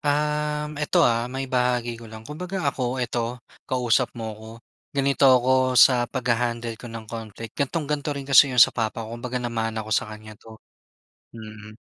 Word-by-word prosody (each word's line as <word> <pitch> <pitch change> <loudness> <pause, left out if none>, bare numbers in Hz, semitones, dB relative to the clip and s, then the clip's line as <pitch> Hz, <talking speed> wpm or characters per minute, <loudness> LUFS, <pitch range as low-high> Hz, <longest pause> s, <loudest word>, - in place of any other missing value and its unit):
uhm, 150 0 -1
ito, 150 - +3
ah, 115 0 +1
maibahagi 125 -2 -1
ko 115 - -11
lang. 110 0 -11
Kumbaga 180 +7 -5
ako, 125 0 -2
ito, 120 -1 -2 0.3
kausap 125 -1 +2
mo 110 -1 -5
ako, 110 +1 -12 0.5
ganito 140 0 +3
ako 130 0 +3
sa 120 -2 +6
pagha-handle 120 -2 -1
ko 120 - -8
ng 115 -1 -8
conflict, 110 0 -8
ganitong-ganito 145 0 -2
rin 140 - -5
kasi 135 0 +6
‘yon 125 - -4
sa - - +8
papa 115 0 -2
ko. 110 - -9
Kumbaga 125 +1 -5
namana 115 -2 -3
ko 110 - -5
sa 105 - +1
kanya 110 0 -10
‘to, 110 -1 -13 0.8
mm, 110 -1 -11
120 Hz, 165 wpm, -24 LUFS, 115-135 Hz, 0.8 s, sa